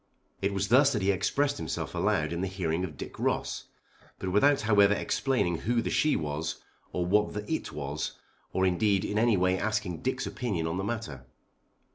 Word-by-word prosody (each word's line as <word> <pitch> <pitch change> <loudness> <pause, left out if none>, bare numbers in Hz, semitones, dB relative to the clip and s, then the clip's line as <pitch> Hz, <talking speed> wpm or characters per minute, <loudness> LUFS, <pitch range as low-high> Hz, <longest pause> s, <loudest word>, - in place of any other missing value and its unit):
It 100 +1 +1
was 100 0 -1
thus 135 +4 +6
that 105 -4 -1
he 100 - +4
expressed 145 +9 0
himself - - -4
aloud 75 +1 +1
in 85 - -2
the 95 - 0
hearing 90 -2 -1
of 80 -6 -5
Dick - - -8
Ross; - - -1 0.5
but 95 - -3
without 140 +9 +4
however 105 -2 +5
explaining 100 - 0
who 120 +2 +1
the 115 - -1
she 150 - +3
was, 75 +1 -2 0.4
or 90 - -1
what 105 +3 +2
the 105 0 -4
it - - -3
was, 75 +1 -4 0.4
or 95 - +1
indeed 95 +2 +2
in 105 - 0
any 115 -2 +4
way 90 +1 +2
asking 110 -5 -2
Dick's 130 +1 -1
opinion 100 -10 -2
on 80 +2 -2
the 95 - -2
matter. 85 - -4
100 Hz, 190 wpm, -29 LUFS, 85-110 Hz, 0.5 s, thus